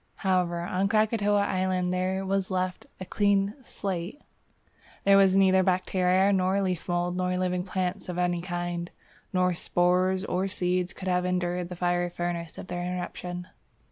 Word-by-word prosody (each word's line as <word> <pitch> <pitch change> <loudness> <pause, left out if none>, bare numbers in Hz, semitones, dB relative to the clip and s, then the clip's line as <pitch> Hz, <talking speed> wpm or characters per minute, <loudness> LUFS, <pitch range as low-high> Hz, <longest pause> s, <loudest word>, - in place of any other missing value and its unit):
However, 180 -2 +1
on 185 +3 0
Krakatoa 205 -1 +2
island 185 -2 0
there 185 +1 -1
was 195 0 0
left 185 -1 -2
a 185 - -5
clean 200 0 +2
"slate." 190 - -4 0.8
There 200 0 +6
were 195 0 +7
neither 190 0 +4
bacteria, 185 +1 +2
nor 190 +1 +2
leaf 185 -3 -2
mould, 175 0 0
nor 180 0 0
living 180 -1 0
plants 185 0 -3
of 180 - -4
any 175 -1 0
kind; 175 -1 -3 0.4
no 180 -1 +2
spores 180 +2 +1
or 185 0 -1
seeds 180 -2 0
could 190 - -8
have 180 -1 +2
endured 180 -1 -1
the 180 - -6
fiery 175 0 0
furnace 175 -1 -4
of - - -7
the 180 -1 -5
eruption. 180 0 -5
185 Hz, 155 wpm, -27 LUFS, 180-190 Hz, 0.8 s, were